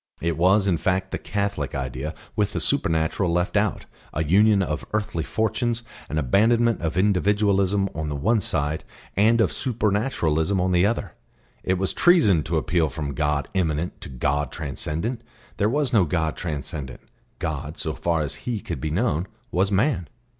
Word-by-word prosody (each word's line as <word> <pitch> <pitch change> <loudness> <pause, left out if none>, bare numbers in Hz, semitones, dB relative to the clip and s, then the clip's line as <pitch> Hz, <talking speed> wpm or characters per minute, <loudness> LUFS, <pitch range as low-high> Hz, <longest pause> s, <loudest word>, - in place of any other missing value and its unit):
It 85 -1 -1
was, 95 +4 +4
in 90 -4 +2
fact, 95 +2 0
the - - -3
Catholic 100 -9 -2
idea 65 +3 -4 0.2
with - - 0
the - - -1
supernatural 80 +3 +1
left 90 +3 0
out, 105 -1 +1 0.3
a 80 - +1
union 100 +5 +4
of 75 -3 -3
earthly 105 -6 -1
fortunes, 115 - -1 0.3
an 75 - -2
abandonment 115 - +3
of 80 0 -2
individualism 100 0 +2
on 80 -1 -3
the 75 - -3
one 110 +10 +2
side, 75 -2 -1 0.3
and 110 +4 +4
of 110 - +3
supernaturalism 100 - 0
on 90 +1 +1
the 90 +2 +4
other. 105 - -2 0.5
It 95 - +1
was 95 +1 0
treason 150 - +5
to 80 +1 0
appeal 80 0 +1
from 75 -2 -4
God 75 -1 0
Immanent 85 -3 -1
to - - -8
God 70 +2 -1
Transcendent; 80 - -3 0.4
there 105 -1 +2
was 140 0 0
no 100 -6 +5
God 80 -1 -1
transcendent; 75 -5 -5 0.4
God, 75 -1 -4
so - - -2
far 85 -2 0
as 75 0 -2 0.2
He 115 -3 -1
could 100 -6 -5
be 80 - -2
known, 90 0 0 0.2
was 95 +3 +1
man. 100 - +1
90 Hz, 170 wpm, -24 LUFS, 80-105 Hz, 0.5 s, treason